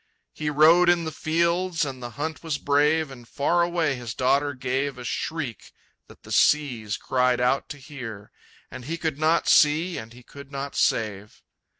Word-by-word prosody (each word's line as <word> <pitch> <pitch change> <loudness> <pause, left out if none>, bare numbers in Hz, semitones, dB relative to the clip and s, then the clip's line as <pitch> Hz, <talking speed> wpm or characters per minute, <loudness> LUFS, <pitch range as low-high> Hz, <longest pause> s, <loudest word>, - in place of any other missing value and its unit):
He 150 - -3
rode 160 +4 +5
in 175 -1 +3
the 160 - -4
fields, 170 +2 0
and 130 -2 -7
the 120 - -5
hunt 160 +2 -4
was 160 -4 -2
brave, 150 +2 +2
And 120 -3 -12
far 170 +5 +1
away 170 -4 +1
his 120 -2 -6
daughter 140 +2 +1
gave 130 +2 -2
A 125 - -8
shriek 130 - -4 0.4
that - - -18
the - - -12
seas 125 -9 +2
cried 125 -1 +1
out 125 +2 +1
to 145 - -7
hear, 125 -8 -9 0.4
And 130 -1 -9
he 165 +4 -3
could 160 -4 -3
not 160 +2 +2
see 160 +4 +4
and 110 +1 -10
he 125 +1 -15
could 140 +2 -13
not 140 0 -5
save. 105 -2 -1
140 Hz, 180 wpm, -25 LUFS, 125-160 Hz, 0.4 s, rode